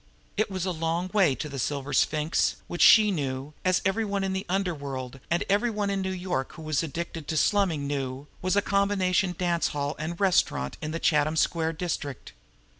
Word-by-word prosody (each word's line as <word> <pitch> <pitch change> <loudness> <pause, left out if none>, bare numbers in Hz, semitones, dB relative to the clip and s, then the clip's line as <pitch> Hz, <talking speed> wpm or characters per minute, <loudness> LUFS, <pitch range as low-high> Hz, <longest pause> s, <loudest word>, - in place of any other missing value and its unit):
It 215 - +1
was 190 -2 -3
a 185 - 0
long 165 +2 -1
way 185 -10 +4
to 155 - -5
the 140 -2 -6
Silver 140 +2 -2
Sphinx, 150 +4 +2
which 175 - -4
she 215 -2 +8
knew, 140 -3 -3
as 185 -1 +2
every 195 +4 +1
one 200 -2 -1
in 190 0 -1
the 190 +2 -3
underworld, 140 -9 -3
and 170 - +1
every 205 +5 +2
one 210 -2 -1
in 195 -1 -1
New 190 - -2
York 180 -7 -3
who 160 - -10
was 155 -2 0
addicted 165 -1 -5
to 160 - -1
slumming 180 -7 +2
knew, 135 -1 -3 0.2
was 185 +1 +1
a 205 - +3
combination 195 -2 +1
dance 175 -2 +1
hall 145 0 -2
and 170 +2 -4
restaurant 180 - +2
in 155 - -3
the 160 - -2
Chatham 155 -1 +2
Square 160 0 +1
district. 155 -5 -4
170 Hz, 195 wpm, -27 LUFS, 145-190 Hz, 0.2 s, she